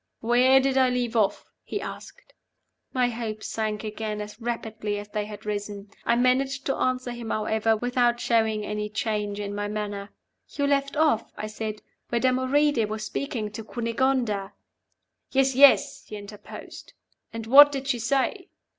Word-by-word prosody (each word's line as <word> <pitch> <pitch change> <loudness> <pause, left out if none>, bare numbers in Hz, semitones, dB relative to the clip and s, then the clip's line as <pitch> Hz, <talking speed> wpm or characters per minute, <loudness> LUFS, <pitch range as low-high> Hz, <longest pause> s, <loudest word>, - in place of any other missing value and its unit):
"Where 250 +3 +5
did 265 0 +2
I 260 -1 +4
leave 245 -2 -1
off?" 205 -3 0
he - - -4
asked. - - -9 0.6
My 250 -1 +2
hopes 225 -2 -5
sank 215 -1 -2
again 215 0 -4
as 210 +2 -8
rapidly 220 -3 -3
as 205 0 -7
they 210 0 -2
had 210 0 -10
risen. 205 -1 -5 0.2
I - - +4
managed 265 +3 +1
to 270 - 0
answer 255 -1 -1
him, 240 -2 -6
however, 220 +1 +1
without 245 0 +1
showing 220 -3 +1
any 210 0 -3
change 210 -1 -2
in 205 -1 -4
my 205 0 -2
manner. 205 -1 -4 0.4
"You 285 - 0
left 280 0 0
off," 300 -8 +2
I - - -4
said, 215 0 -5 0.3
"where 235 - +1
Damoride 260 0 +2
was 215 0 -4
speaking 230 -5 -3
to 220 +1 -7
Cunegonda 230 -3 -1 0.4
" - - -51
"Yes, 270 0 +3
yes!" 275 +1 +5
he 215 - -7
interposed. 205 0 -10 0.4
"And 225 -1 -6
what 285 +5 +9
did 270 -1 -4
she 250 -4 0
say?" 275 - 0
230 Hz, 165 wpm, -26 LUFS, 210-260 Hz, 0.6 s, what